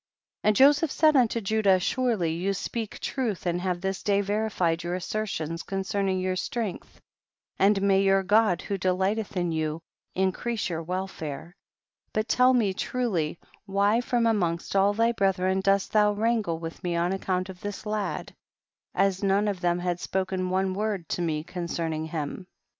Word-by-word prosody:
56. -, -, -2 dB
And 215 Hz, -, +4 dB
Joseph 290 Hz, +4 st, +5 dB
said 310 Hz, -1 st, +4 dB
unto 235 Hz, -3 st, +3 dB
Judah, 200 Hz, -2 st, +3 dB
surely 215 Hz, -5 st, 0 dB
you 190 Hz, +4 st, -1 dB
speak 225 Hz, +2 st, -4 dB
truth 235 Hz, -10 st, -2 dB
and 175 Hz, 0 st, 0 dB
have 180 Hz, -1 st, -2 dB
this 190 Hz, 0 st, -2 dB
day 200 Hz, -1 st, +2 dB
verified 200 Hz, -5 st, 0 dB
your 175 Hz, +1 st, -2 dB
assertions 175 Hz, -4 st, -3 dB
con 195 Hz, 0 st, -3 dB
cerning 190 Hz, -1 st, 0 dB
your 185 Hz, 0 st, -1 dB
strength, 215 Hz, +1 st, -4 dB, 0.6 s
and 200 Hz, +1 st, +4 dB
may 195 Hz, -1 st, +4 dB
your 195 Hz, 0 st, +3 dB
God 205 Hz, -3 st, +3 dB
who 200 Hz, -1 st, -3 dB
delightelTi 190 Hz, +4 st, 0 dB
in 175 Hz, -1 st, 0 dB
you, 155 Hz, 0 st, -1 dB, 0.4 s
increase 190 Hz, +4 st, -1 dB
your 165 Hz, -1 st, -3 dB
welfare; 175 Hz, -2 st, -5 dB, 0.6 s
but 215 Hz, +1 st, 0 dB
tell 255 Hz, +1 st, +4 dB
me 210 Hz, -6 st, +2 dB
truly 185 Hz, -9 st, -1 dB, 0.3 s
why 200 Hz, +4 st, +2 dB
from 240 Hz, -1 st, +1 dB
amongst 180 Hz, -6 st, 0 dB
all 200 Hz, +1 st, +4 dB
thy 230 Hz, +2 st, +3 dB
brethren 190 Hz, -3 st, +1 dB
dost 195 Hz, 0 st, +1 dB
thou 210 Hz, -1 st, +4 dB
wrangle 215 Hz, -5 st, 0 dB
with 165 Hz, 0 st, -8 dB
me 175 Hz, -1 st, -1 dB
on 175 Hz, +2 st, +1 dB
account 185 Hz, -1 st, -1 dB
of 180 Hz, -1 st, -10 dB
the 205 Hz, 0 st, -5 dB
lad, 210 Hz, -1 st, -3 dB, 0.6 s
as 195 Hz, -1 st, +2 dB
none 200 Hz, +1 st, +2 dB
of 195 Hz, -3 st, -2 dB
them 175 Hz, 0 st, +2 dB
had 175 Hz, 0 st, -2 dB
spoken 185 Hz, -1 st, -2 dB
one 190 Hz, 0 st, 0 dB
word 200 Hz, -3 st, -2 dB
to -, -, -2 dB
me 155 Hz, -3 st, -1 dB
concerning 170 Hz, -3 st, -3 dB
him. 160 Hz, +3 st, -5 dB
190 Hz, 170 wpm, -27 LUFS, 175-210 Hz, 0.6 s, Joseph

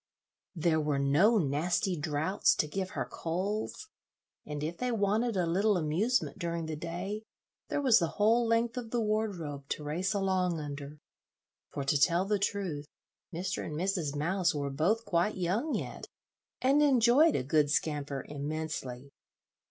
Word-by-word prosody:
There 160 Hz, -1 st, +2 dB
were 150 Hz, -2 st, 0 dB
no 150 Hz, +12 st, +4 dB
nasty 175 Hz, +4 st, +1 dB
draughts 155 Hz, +4 st, +1 dB
to 150 Hz, -, 0 dB
give 190 Hz, +4 st, -3 dB
her -, -, 0 dB
colds, 200 Hz, -, -3 dB, 0.6 s
and 150 Hz, -1 st, -4 dB
if 165 Hz, +3 st, -3 dB
they 250 Hz, 0 st, -1 dB
wanted 215 Hz, +1 st, +1 dB
a 180 Hz, -, +2 dB
little 195 Hz, +4 st, +2 dB
amusement 180 Hz, +11 st, 0 dB
during 170 Hz, -1 st, -2 dB
the 160 Hz, -1 st, -4 dB
day, 175 Hz, +7 st, -4 dB, 0.5 s
there 290 Hz, -, -1 dB
was 250 Hz, -5 st, +6 dB
the 170 Hz, -, +1 dB
whole 225 Hz, +3 st, +4 dB
length 230 Hz, +1 st, +1 dB
of 235 Hz, -2 st, -4 dB
the 240 Hz, -, 0 dB
wardrobe 195 Hz, -11 st, -2 dB
to 150 Hz, -, -3 dB
race 180 Hz, +8 st, -1 dB
along 185 Hz, -3 st, +1 dB
under; 145 Hz, 0 st, -7 dB, 0.7 s
for, 140 Hz, -, -4 dB
to 140 Hz, +1 st, +1 dB
tell 175 Hz, +3 st, +4 dB
the 205 Hz, 0 st, +1 dB
truth, 185 Hz, -7 st, -2 dB, 0.4 s
Mr. 180 Hz, +2 st, -3 dB
and 150 Hz, -, -5 dB
Mrs. 175 Hz, -4 st, -1 dB
Mouse 175 Hz, +3 st, +1 dB
were 140 Hz, -1 st, -2 dB
both 195 Hz, +11 st, +1 dB
quite 190 Hz, +1 st, +1 dB
young 195 Hz, -, 0 dB
yet, -, -, -5 dB, 0.6 s
and 275 Hz, +3 st, +4 dB
enjoyed 275 Hz, +2 st, +5 dB
a -, -, 0 dB
good 150 Hz, +1 st, +2 dB
scamper 145 Hz, -3 st, -1 dB
immensely. 145 Hz, -3 st, -5 dB
175 Hz, 155 wpm, -31 LUFS, 150-210 Hz, 0.7 s, was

